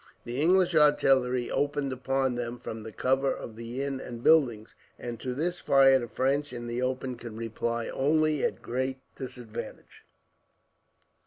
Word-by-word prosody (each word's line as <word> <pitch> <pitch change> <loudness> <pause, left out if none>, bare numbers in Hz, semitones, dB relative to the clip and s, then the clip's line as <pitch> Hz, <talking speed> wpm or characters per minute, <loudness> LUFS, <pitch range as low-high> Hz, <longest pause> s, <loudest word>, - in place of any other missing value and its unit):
The 120 +4 -3
English 180 +2 +4
artillery 135 -5 +3
opened 145 -2 0
upon 135 0 0
them 120 0 -4
from 110 -2 -7
the 110 +1 -8
cover 135 +4 +1
of 110 - -6
the 115 +4 -5
inn 140 -1 -3
and 120 -2 -8
buildings, 125 -9 +3 0.2
and 120 -2 -6
to 125 -1 -4
this 175 +5 -1
fire 135 -1 +5
the 120 - -5
French 140 +5 0
in 120 -1 -6
the 120 +1 -3
open 130 0 -2
could 115 -2 -8
reply 115 +1 -2
only 155 +1 +1
at - - 0
a - - -27
great 130 +2 -2 0.2
disadvantage. 125 -4 -8
130 Hz, 160 wpm, -28 LUFS, 120-140 Hz, 0.2 s, fire